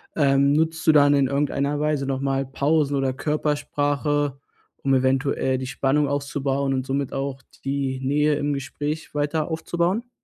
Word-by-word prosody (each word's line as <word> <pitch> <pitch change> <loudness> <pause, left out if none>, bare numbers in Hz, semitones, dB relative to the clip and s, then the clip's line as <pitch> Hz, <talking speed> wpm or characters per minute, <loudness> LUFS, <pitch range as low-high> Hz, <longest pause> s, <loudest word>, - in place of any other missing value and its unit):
ähm, 140 -1 +3
nutzt 160 +1 0
du - - +9
dann 145 -1 +6
in 140 -2 +3
irgendeiner 140 +1 0
Weise 150 -2 0
noch 135 -1 -2
mal 135 0 0
Pausen 145 +2 +1
oder 135 -1 0
Körpersprache, 145 -1 -1 0.4
um 135 0 0
eventuell 130 0 +1
die 130 0 -5
Spannung 140 +2 +1
aufzubauen 140 -1 -1
und 130 -1 -1
somit 135 0 -2
auch 135 0 -3 0.2
die 135 -1 -1
Nähe 150 +3 +2
im 145 0 -1
Gespräch 145 +3 -4
weiter 150 +2 -1
aufzubauen? 175 +8 -1
140 Hz, 150 wpm, -23 LUFS, 135-150 Hz, 0.4 s, du